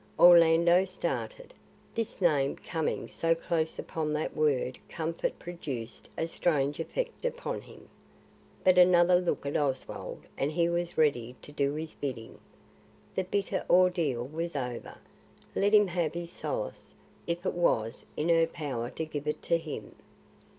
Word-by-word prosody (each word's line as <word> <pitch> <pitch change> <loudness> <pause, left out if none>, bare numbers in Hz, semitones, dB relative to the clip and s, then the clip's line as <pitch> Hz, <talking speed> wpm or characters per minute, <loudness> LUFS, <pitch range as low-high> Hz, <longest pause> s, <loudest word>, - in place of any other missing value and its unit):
Orlando 170 +1 +7
started. 465 - -4 0.4
This 230 -3 -3
name 145 -6 +3
coming 160 -2 -3
so 165 0 +1
close 165 -1 -1
upon 155 -2 -3
that 150 +1 -2
word 140 -4 +1
comfort 165 0 -2
produced 135 -10 -6
a 160 - 0
strange 150 -4 0
effect 480 - -3
upon - - -3
him. - - -15 0.8
But 185 -1 +6
another 180 0 +6
look 175 -4 -1
at 140 - -2
Oswald 135 -3 -2 0.2
and 140 +2 +1
he 170 +1 +2
was 170 0 -2
ready 125 -6 +2
to - - -10
do 140 0 0
his 160 +1 -5
bidding. 125 -5 -6 0.7
The 190 - -1
bitter 195 +1 -1
ordeal 170 -9 +3
was 165 +4 -4
over; 125 -3 -4 0.6
let 200 +1 +2
him 210 -1 +7
have 175 -3 -1
his 170 0 -5
solace - - -5 0.3
if 170 +2 -2
it - - 0
was 115 -9 0
in 155 +3 0
her 165 -1 +5
power 135 -8 -4
to 160 - -4
give 150 -1 -5
it 150 - -2
to 170 - +2
him. 160 -2 -7
165 Hz, 150 wpm, -29 LUFS, 145-175 Hz, 0.8 s, Orlando